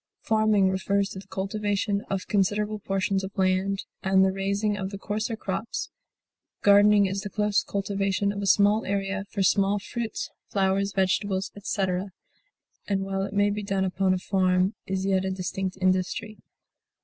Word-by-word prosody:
Farming 215 -3 +3
refers 195 +1 0
to 190 - -7
the 195 - -13
cultivation 200 +1 -1
of 195 -1 -2
considerable 210 +1 0
portions 195 0 -1
of 190 +1 -7
land, 190 +1 +1 0.2
and 190 0 +4
the 190 - +2
raising 200 +2 -1
of 190 -2 -3
the 200 - -6
coarser 215 +3 -3
crops; 225 +1 -4 0.7
gardening 205 0 +6
is 195 +1 -2
the 205 - -5
close 210 +1 +1
cultivation 200 0 -1
of 200 0 -5
a 200 - -2
small 205 +3 +4
area 195 0 -2
for 200 - -1
small 200 +1 +3
fruits, 225 +2 -4 0.2
flowers, 195 0 +1
vegetables, 190 0 0
etc., 190 -1 -2 0.8
and 195 -1 0
while 195 0 -2
it 195 - -3
may 205 0 +3
be 210 +1 -3
done 195 -1 0
upon 190 +1 +1
a 185 - +2
farm 185 +1 +1
is 190 0 -2
yet 190 -1 +2
a 190 - -1
distinct 190 0 -3
industry. 185 +4 0
195 Hz, 160 wpm, -26 LUFS, 190-205 Hz, 0.8 s, gardening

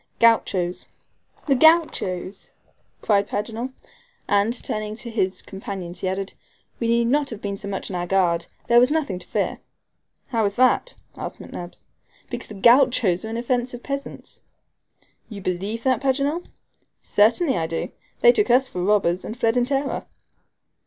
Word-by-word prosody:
"Gauchos." 190 -6 +2 0.6
"The 280 - +3
Gauchos!" 250 - +2 0.5
cried 200 -2 +2
Paganel; 225 +5 -3 0.6
and, 205 +2 +3
turning 215 -3 -4
to 235 0 -7
his 190 -4 -1
companions, 190 -3 -7
he 190 - -1
added, 190 +1 -3 0.5
"we 230 - -1
need 235 0 +3
not 280 +4 +1
have 225 - -6
been 200 -2 -3
so 200 +1 -8
much 195 0 -4
on - - -4
our 175 0 -2
guard; 175 -3 +1 0.2
there 235 0 +6
was 250 +1 +5
nothing 290 - -1
to - - -14
fear." - - -1 0.7
"How 230 -3 +1
is 200 0 -1
that?" 255 - +3 0.2
asked - - -6
McNabbs. 175 0 -9 0.5
"Because - - -5
the 210 - -9
Gauchos 235 -4 +4
are - - -5
inoffensive 245 +1 -2
peasants." 275 0 -6 0.9
"You 210 -3 -7
believe 195 +5 -3
that, 255 -3 +2
Paganel?" 280 +5 0 0.6
"Certainly 240 +8 +3
I 160 - -1
do. 165 0 -3 0.3
They 485 - +8
took 420 -3 +1
us 260 +2 +4
for 180 - -4
robbers, 190 -3 +2
and 220 - -6
fled 230 -1 +1
in 245 -1 +3
terror." 275 +1 -2
225 Hz, 155 wpm, -23 LUFS, 195-255 Hz, 0.9 s, They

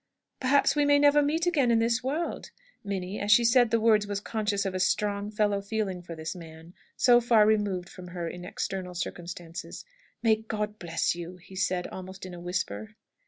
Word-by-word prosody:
"Perhaps 280 +2 +3
we 295 - +3
may 285 0 +5
never 290 0 +5
meet 315 +4 +1
again 295 -8 +2
in 230 - +4
this 230 +2 +1
world!" 300 +6 -3 0.3
Minnie, 195 -1 -4
as 205 +1 0
she 235 +3 +7
said 240 0 +5
the 230 +1 +2
words, 215 -2 +3
was 200 -1 -2
conscious 205 -1 -1
of 190 - -2
a 185 - -2
strong 205 +1 0
fellow 205 -1 +1
feeling 200 -3 -3
for 170 -1 -8
this 160 +1 -5
man, 165 0 -12 0.2
so 245 -1 +6
far 230 -3 +5
removed 205 -4 +1
from 180 0 -11
her 175 -1 -5
in 175 +1 -7
external 180 0 -4
circumstances. 170 - -6 0.4
"May 220 -2 +4
God 215 -1 -4
bless 170 -1 0
you!" 175 +1 -7
he 185 +2 -15
said, 185 -1 0
almost 190 0 -8
in 185 - -8
a 175 - -8
whisper. 205 +4 -4
205 Hz, 195 wpm, -28 LUFS, 180-230 Hz, 0.4 s, she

